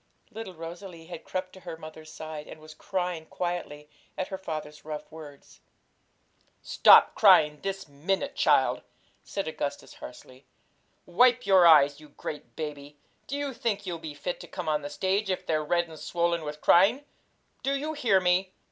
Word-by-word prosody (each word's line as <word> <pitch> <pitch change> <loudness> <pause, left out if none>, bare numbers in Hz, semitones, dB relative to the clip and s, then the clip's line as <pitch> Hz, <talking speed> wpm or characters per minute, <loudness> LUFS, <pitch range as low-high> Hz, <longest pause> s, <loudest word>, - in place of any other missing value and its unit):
Little 210 -4 -8
Rosalie 170 +1 -9
had 170 -1 -9
crept 185 0 -5
to 190 - -12
her 170 -3 -8
mother's 155 -1 -11
side, 155 -1 -8
and - - -11
was 155 0 -13
crying 180 -4 -3
quietly 175 -4 -4 0.3
at 185 - -3
her 190 - -4
father's 155 -4 -6
rough 150 -1 -6
words. 150 -3 -13 1.0
'Stop - - +6
crying 150 -1 +5
this 195 -2 -4
minute, 190 - -2
child!' - - +3 0.4
said 195 -3 -4
Augustus 145 -2 -5
harshly. 130 +1 -13 0.6
'Wipe 245 +7 +3
your 190 -3 +6
eyes, 145 -3 +6
you 155 -1 -15
great 150 +1 -8
baby! 145 -2 -7 0.3
Do 280 - -3
you 285 -1 -3
think 205 -4 -2
you'll 175 -3 -4
be 155 -2 -8
fit 175 +5 -4
to - - -10
come 180 -3 -6
on 150 -1 +1
the 145 - -6
stage 195 +4 -1
if 185 - -2
they're 155 -1 0
red 170 +3 0
and 160 -2 -12
swollen 170 -1 -1
with 150 0 -7
crying? 220 +11 +4 0.6
Do 275 +1 0
you 305 +3 -4
hear 245 -10 +3
me? 185 +1 +1
170 Hz, 170 wpm, -27 LUFS, 155-190 Hz, 1.0 s, Stop